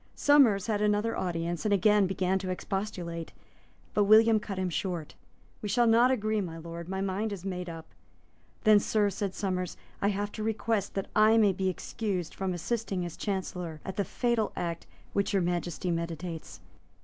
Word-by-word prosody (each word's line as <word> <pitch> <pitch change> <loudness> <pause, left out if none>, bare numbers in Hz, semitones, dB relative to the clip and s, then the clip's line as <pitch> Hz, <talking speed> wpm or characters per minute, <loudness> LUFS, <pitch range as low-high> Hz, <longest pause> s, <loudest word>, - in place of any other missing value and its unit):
Somers 255 -10 +5
had 210 -2 0
another 210 +2 +1
audience, 170 -1 -2
and 215 - 0
again 205 0 +4
began 190 0 0
to 185 -1 -5
expostulate. 180 -3 -4 0.6
But 205 - +3
William 220 +1 +6
cut 205 -2 -6
him 185 -1 -1
short. 170 -3 -3 0.5
"We 210 - -4
shall 240 +4 +3
not 235 +2 +5
agree, 215 -4 +1
my 165 -4 -5
Lord; 170 +1 -8
my 190 0 -2
mind 195 +3 -1
is 195 -2 -6
made 180 -2 -4
up." 165 -1 -8 0.8
"Then, 215 -2 +7
Sir," 205 0 +1
said 195 0 -3
Somers, 185 -3 -2 0.2
"I 200 - +2
have 205 0 -1
to 215 - -6
request 220 -2 -1
that 195 - -1
I 215 +1 +6
may 210 -3 +5
be 190 +1 0
excused 185 -1 -3
from 190 -1 -2
assisting 195 0 -2
as 170 - -6
Chancellor 180 -5 -4
at 190 - -5
the 200 - +1
fatal 235 0 0
act 170 -1 -4 0.3
which 200 0 0
Your 195 - +3
Majesty 175 0 -1
meditates. 165 0 -5
195 Hz, 175 wpm, -29 LUFS, 180-215 Hz, 0.8 s, Then